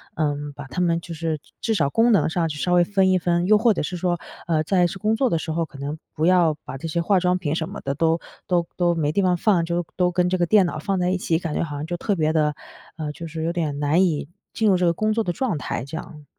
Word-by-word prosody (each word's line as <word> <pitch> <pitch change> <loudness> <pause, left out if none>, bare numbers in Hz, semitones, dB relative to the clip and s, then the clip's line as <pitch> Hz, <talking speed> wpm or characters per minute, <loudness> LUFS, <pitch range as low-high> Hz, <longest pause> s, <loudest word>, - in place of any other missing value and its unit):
嗯， 145 -1 -1
把 145 0 -9
它 130 +7 -3
们 170 -1 +2
就 170 0 -8
是 160 -1 -2 0.2
至 225 - 0
少 145 -8 +2
功 230 +1 +4
能 195 -9 +4
上 165 0 0
去 150 - -5
稍 180 +4 0
微 175 0 +6
分 190 +1 +2
一 185 - +3
分。 175 0 +1
又 210 +3 +5
或 230 0 +4
者 - - -1
是 180 - -4
说， 175 -1 0 0.3
呃， 160 -2 +2
在 180 +1 +3
是 185 - -6
工 215 +3 +1
作 255 +3 +2
的 165 - +1
时 160 - -4
候， 165 +1 0
可 145 - -14
能 145 +3 -4 0.2
不 155 - 0
要 175 -3 +4
把 - - -6
这 165 - -5
些 170 +2 -1
化 195 +2 +3
妆 180 0 +2
品 160 -4 -2
什 160 0 -2
么 205 - -7
的 135 - -2
都 165 +3 +1 0.3
都 175 -2 +1
都 175 -1 +2
没 150 -3 0
地 200 - +1
方 180 -2 +2
放， 190 -3 +2
就 170 +1 -1
都 180 -1 +2
跟 180 0 +1
这 185 +1 +1
个 175 - +3
电 205 0 +5
脑 170 -3 -3
放 190 +4 -1
在 180 0 +1
一 185 - +1
起， 165 -2 0
感 165 -3 -4
觉 - - 0
好 150 -3 -5
像 145 +1 -4
就 175 +2 -3
特 205 +3 -1
别 155 -2 +1
地 150 -2 +1 0.4
呃， 155 -2 -3
就 165 +3 -8
是 160 0 -5
有 165 +1 -1
点 155 -5 -2
难 150 +5 +3
以 155 -6 0 0.3
进 220 - +1
入 190 - +5
这 180 - -1
个 170 - +4
工 215 +5 0
作 225 +1 +1
的 180 - -1
状 220 - -1
态 125 - -4
这 140 - -8
样。 150 -2 -10
170 Hz, 320 characters per minute, -23 LUFS, 155-185 Hz, 0.4 s, 微